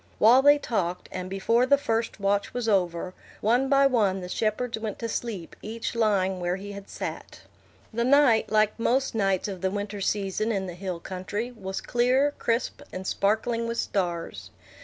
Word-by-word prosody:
While 240 +5 +7
they 290 +1 +7
talked, 180 -10 -2
and 185 0 -5
before 230 +6 +2
the 280 +1 +5
first 225 -5 -2
watch 200 +2 0
was 245 -2 -2
over, 180 -3 0 0.3
one 245 +5 +2
by 275 -1 +5
one 210 -8 +2
the 180 - -7
shepherds 220 +3 -1
went 220 -2 -4
to 230 - -4
sleep, 215 -7 -4
each 225 +2 -4
lying 200 -5 +1
where 175 0 -1
he 200 +2 -7
had 200 0 -9
sat. - - -6 0.5
The 235 +1 0
night, 255 -5 +4
like 215 +1 +2
most 260 +4 +1
nights 195 -4 +1
of 190 -3 -6
the 190 - +1
winter 205 +1 -4
season 205 +2 0
in 195 -3 -1
the 180 - -6
hill 180 -1 -5
country, 195 +7 -4
was 195 -4 -5
clear, 255 +4 +2
crisp, 235 +4 -1
and 185 +1 -6
sparkling 225 +4 0
with 230 0 -3
stars. 175 -6 -2
215 Hz, 180 wpm, -26 LUFS, 190-235 Hz, 0.5 s, While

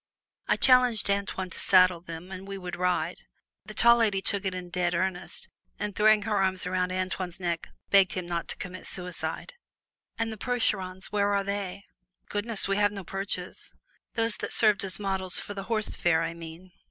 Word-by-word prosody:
I - - +4
challenged 250 -5 +4
Antoine 200 -2 -2
to - - -6
saddle 185 -2 +5
them 170 +1 -8
and 190 +1 -7
we 195 0 -5
would 180 -2 -5
ride. 180 0 0 0.5
The - - -9
tall 235 0 +7
lady 215 -4 +2
took 200 0 +1
it 190 -1 -1
in 180 -1 -7
dead 175 -1 0
earnest, 185 +1 -2 0.3
and 210 -2 -4
throwing 215 0 +5
her 210 -1 0
arms 190 -1 0
around 180 0 0
Antoine's 185 -1 -3
neck 170 -2 -2 0.2
begged 195 -2 +6
him 185 -1 -3
not 170 -1 -3
to - - -4
commit 185 0 -7
suicide. 180 - -4 0.6
"And 225 -1 -1
the - - -9
Percherons 195 -6 -1
where 205 -1 +2
are 200 - +1
they?" 200 -1 -4 0.5
"Goodness! 210 0 +1
we 195 0 +1
have 205 0 +3
no 200 -2 -6
Perches." 195 -1 -5 0.4
"Those 225 -1 +1
that - - -3
served 210 -3 +4
as 190 -1 -1
models 190 -2 0
for 205 - -6
the 195 -1 -6
'Horse 215 -1 0
Fair,' 165 -1 +2
I 165 0 -2
mean." 170 +2 -10
190 Hz, 190 wpm, -28 LUFS, 180-205 Hz, 0.6 s, tall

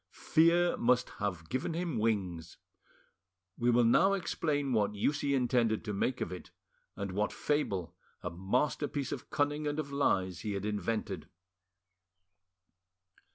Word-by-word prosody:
Fear 170 +2 +5
must 125 +1 +2
have 90 -6 -2
given 130 +6 -2
him 170 -8 -2
wings. 90 -7 -1 1.0
We 120 0 +1
will 120 0 +5
now 175 +12 +5
explain 150 -7 -1
what 105 -2 +1
use 145 +8 0
he 140 -1 +1
intended 120 -4 +1
to 105 - -2
make 125 +6 -1
of - - -2
it, 90 - -8 0.5
and 100 -1 -4
what 105 +3 0
fable, 100 - -1 0.3
a 90 - -3
masterpiece 130 - -1
of - - -6
cunning 145 0 0
and 145 0 -1
of 145 -2 -3
lies, 95 - +1
he 105 - -3
had 100 0 -3
invented. 105 -5 -2
120 Hz, 140 wpm, -32 LUFS, 100-145 Hz, 1.0 s, Fear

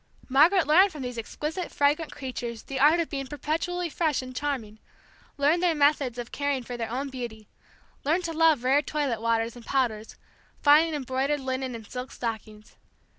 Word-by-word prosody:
Margaret 320 +7 +5
learned 365 +7 +5
from 295 -5 -7
these 245 -2 -4
exquisite, 310 - -4
fragrant 295 +2 +1
creatures 245 -4 -6
the 270 -1 -5
art 300 +5 +5
of 335 - 0
being 275 -2 -4
perpetually 330 +5 -2
fresh 310 -4 0
and 255 0 -9
charming, 250 -7 -3 0.6
learned 295 +5 +3
their 350 -3 +2
methods 285 -4 +2
of 240 -1 -6
caring 285 -3 -1
for 245 +1 -6
their 230 -2 -4
own 265 +4 -3
beauty, 235 -5 -7 0.6
learned 325 +6 +1
to 335 -1 -3
love 320 -5 +4
rare 270 +3 +4
toilet 285 -7 -2
waters 230 0 0
and 240 - -11
powders, 230 -5 -1 0.4
fine 310 +2 +5
embroidered 270 +1 -1
linen 260 -1 -3
and 225 -2 -9
silk 250 +4 -7
stockings. 215 -2 -6
275 Hz, 175 wpm, -27 LUFS, 245-305 Hz, 0.6 s, Margaret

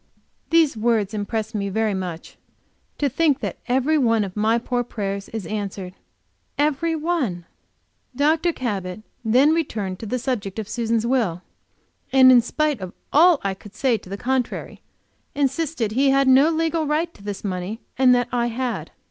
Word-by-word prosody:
These 330 -5 +4
words 220 -2 +1
impressed 215 +2 -3
me 200 -2 -2
very 215 +1 0
much. 180 -3 -5 0.6
To 290 - +1
think 285 +1 +2
that - - -4
every 265 +5 +2
one 230 -4 +3
of 190 -2 -6
my 220 +2 +2
poor 245 +1 -1
prayers 200 -4 -4
is 220 -4 -5
answered! 195 -2 -5 0.6
Every 305 +3 +1
one! 300 - -1 0.7
Dr. 310 +5 +2
Cabot 205 - -4 0.2
then 255 +7 +4
returned 215 - -2
to 225 - -6
the 250 - -1
subject 230 -6 -3
of 220 -2 -4
Susan's 230 -1 -1
will, 220 -9 0 0.7
and 260 -1 +7
in 245 -1 +7
spite 300 -1 -1
of 185 -1 -6 0.2
all 330 +1 +6
I 195 -1 0
could 205 +2 -14
say 255 0 +2
to 185 - -15
the 200 - -5
contrary, 255 +2 -2 0.5
insisted 280 -4 -1
that - - -6
he 275 +2 +4
had 275 0 +3
no 265 +4 +6
legal 325 -1 0
right 320 +3 0
to - - -18
this 200 -1 -6
money, 190 +2 -4 0.2
and 255 -1 +5
that 245 0 +1
I 240 -1 +1
had. 245 +1 -3
240 Hz, 170 wpm, -22 LUFS, 205-280 Hz, 0.7 s, and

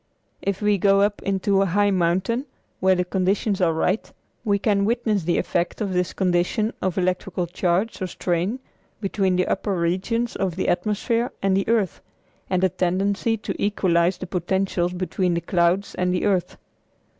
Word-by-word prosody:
If 200 +1 -2
we 210 -1 +3
go 195 +1 +4
up 205 0 +1
into 195 0 +1
a 195 - +2
high 205 +3 +2
mountain 190 - 0 0.3
when 190 0 +3
the 180 - 0
conditions 190 +2 0
are 170 -2 +4
right, 180 +6 -1 0.3
we 200 -2 +2
can 200 -1 +1
witness 215 -4 0
the 175 - +1
effect 175 0 -1
of 200 -4 -2
this 180 -1 0
condition 190 +4 0
of 185 -1 -1
electrical 180 0 -1
charge 180 +5 -1
or 185 - -1
strain 180 +5 -1 0.4
between 195 -2 0
the 180 0 +2
upper 195 0 -1
regions 190 +8 -1
of 185 -4 -1
the 185 - -1
atmosphere 215 +6 0
and 195 -1 +3
the 195 - 0
earth, 220 -5 +1 0.5
and 185 0 +1
the 190 - +4
tendency 195 +6 0
to 210 - -4
equalize 180 -3 +2
the - - -6
potentials 180 0 -1
between 180 0 -1
the - - +1
clouds 175 +3 +1
and 180 0 0
the 180 - 0
earth. 190 -4 0
190 Hz, 170 wpm, -23 LUFS, 180-205 Hz, 0.5 s, go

